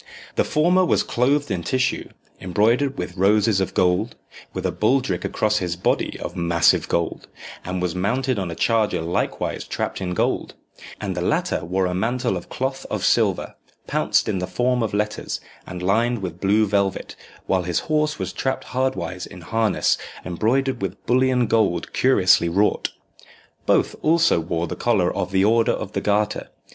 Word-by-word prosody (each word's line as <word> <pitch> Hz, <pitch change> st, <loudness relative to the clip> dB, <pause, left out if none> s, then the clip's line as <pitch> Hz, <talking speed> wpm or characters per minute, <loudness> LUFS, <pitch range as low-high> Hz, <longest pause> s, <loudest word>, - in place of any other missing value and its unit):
The -, -, +2 dB
former 175 Hz, +5 st, +3 dB
was 180 Hz, -, +2 dB
clothed 140 Hz, +3 st, +1 dB
in 90 Hz, -3 st, -1 dB
tissue, 130 Hz, +9 st, -1 dB, 0.3 s
embroidered 115 Hz, +10 st, +1 dB
with -, -, -5 dB
roses 100 Hz, +1 st, +3 dB
of 95 Hz, -, -3 dB
gold, 90 Hz, +5 st, +1 dB, 0.4 s
with -, -, -5 dB
a -, -, +1 dB
baldric 110 Hz, -5 st, +1 dB
across 105 Hz, 0 st, +1 dB
his 90 Hz, -2 st, -2 dB
body 90 Hz, -, -1 dB
of -, -, -6 dB
massive 85 Hz, -1 st, +3 dB
gold, 85 Hz, -1 st, -1 dB, 0.4 s
and 90 Hz, 0 st, -3 dB
was 90 Hz, -2 st, -1 dB
mounted 125 Hz, +6 st, 0 dB
on 95 Hz, -3 st, -3 dB
a 85 Hz, -, -5 dB
charger 115 Hz, +1 st, +1 dB
likewise 85 Hz, +2 st, -2 dB
trapped -, -, -3 dB
in 90 Hz, -1 st, -2 dB
gold; -, -, -1 dB, 0.4 s
and -, -, -3 dB
the -, -, -2 dB
latter -, -, 0 dB
wore 95 Hz, +3 st, 0 dB
a 90 Hz, -, -1 dB
mantle 115 Hz, +2 st, 0 dB
of 90 Hz, -, -7 dB
cloth 135 Hz, +1 st, -3 dB
of -, -, -2 dB
silver, -, -, +2 dB, 0.3 s
pounced -, -, +1 dB
in 100 Hz, -4 st, -1 dB
the 90 Hz, -, -3 dB
form 125 Hz, 0 st, 0 dB
of 110 Hz, -3 st, -1 dB
letters, 105 Hz, 0 st, -2 dB, 0.3 s
and 90 Hz, -1 st, -6 dB
lined 115 Hz, +3 st, +1 dB
with 90 Hz, -1 st, -6 dB
blue 105 Hz, +3 st, +3 dB
velvet, 100 Hz, -1 st, -1 dB, 0.3 s
while 95 Hz, -1 st, +1 dB
his 85 Hz, -1 st, -1 dB
horse 150 Hz, -1 st, 0 dB
was 95 Hz, -1 st, -4 dB
trapped 130 Hz, -, -2 dB
hardwise 130 Hz, -8 st, -2 dB
in 90 Hz, -, -12 dB
harness 110 Hz, +4 st, +1 dB, 0.3 s
embroidered 125 Hz, +7 st, 0 dB
with 95 Hz, 0 st, -5 dB
bullion 125 Hz, 0 st, +3 dB
gold 110 Hz, -6 st, +1 dB
curiously 95 Hz, -9 st, +4 dB
wrought. 100 Hz, +5 st, +1 dB, 0.8 s
Both -, -, +2 dB
also 165 Hz, -, +3 dB
wore 85 Hz, +1 st, -2 dB
the 80 Hz, -, -5 dB
collar 100 Hz, -7 st, +1 dB
of 90 Hz, -, -2 dB
the 95 Hz, 0 st, +2 dB
Order 115 Hz, +1 st, +3 dB
of -, -, -5 dB
the -, -, -2 dB
Garter. 105 Hz, 0 st, 0 dB
105 Hz, 170 wpm, -22 LUFS, 90-125 Hz, 0.8 s, curiously